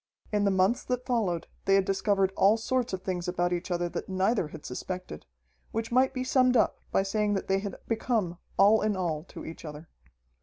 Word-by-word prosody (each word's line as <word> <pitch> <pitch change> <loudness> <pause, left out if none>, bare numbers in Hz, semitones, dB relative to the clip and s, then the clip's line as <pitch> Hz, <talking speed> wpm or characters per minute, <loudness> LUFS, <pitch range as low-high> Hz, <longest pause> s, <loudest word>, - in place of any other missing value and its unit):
In 205 -1 +2
the - - +4
months 190 +5 +2
that 250 0 -2
followed 210 -10 0 0.2
they 195 - +4
had 195 -1 +3
discovered 195 0 +1
all 205 +3 +5
sorts 250 +2 -1
of 185 -1 -4
things 180 -2 -3
about 175 0 0
each 175 +1 -3
other 175 -1 0
that - - -5
neither 190 0 +1
had 150 0 -11
suspected, 180 - -6 0.4
which 225 +1 -3
might 260 +2 +4
be 255 -1 -3
summed 255 -1 +3
up 220 - +2
by 195 - +3
saying 205 +1 0
that 195 - -3
they 195 0 +2
had 200 -1 -5
become 220 -6 -1 0.2
all 205 +3 +6
in 210 -1 +1
all 160 -4 -1
to - - -10
each 165 - -8
other. 150 +1 -9
195 Hz, 205 wpm, -28 LUFS, 180-225 Hz, 0.4 s, all